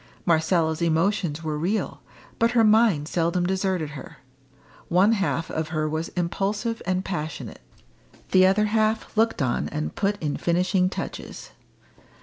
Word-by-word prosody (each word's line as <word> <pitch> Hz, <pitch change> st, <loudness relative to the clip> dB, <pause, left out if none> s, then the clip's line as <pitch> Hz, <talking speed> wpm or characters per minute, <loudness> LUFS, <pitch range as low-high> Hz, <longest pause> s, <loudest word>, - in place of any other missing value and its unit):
Marcella's 160 Hz, -1 st, +2 dB
emotions 170 Hz, -1 st, 0 dB
were 155 Hz, -1 st, -2 dB
real, 195 Hz, +7 st, -2 dB, 0.4 s
but 230 Hz, +1 st, +2 dB
her 235 Hz, -2 st, +4 dB
mind 215 Hz, -8 st, +4 dB
seldom 170 Hz, +1 st, 0 dB
deserted 185 Hz, -4 st, -1 dB
her. 145 Hz, -, -10 dB, 0.7 s
One 185 Hz, +5 st, +4 dB
half 195 Hz, -6 st, -1 dB
of 160 Hz, 0 st, -2 dB
her 155 Hz, -1 st, -1 dB
was 155 Hz, +2 st, -2 dB
impulsive 205 Hz, +6 st, -1 dB
and 185 Hz, +1 st, 0 dB
passionate; 160 Hz, -4 st, -5 dB, 0.7 s
the 185 Hz, 0 st, +6 dB
other 205 Hz, +3 st, +3 dB
half 220 Hz, +1 st, 0 dB
looked 225 Hz, -7 st, +2 dB
on 125 Hz, -, -1 dB
and 155 Hz, +1 st, -4 dB
put 205 Hz, 0 st, 0 dB
in 150 Hz, -2 st, -2 dB
finishing 180 Hz, +2 st, +1 dB
touches. -, -, -7 dB
180 Hz, 135 wpm, -24 LUFS, 160-205 Hz, 0.7 s, the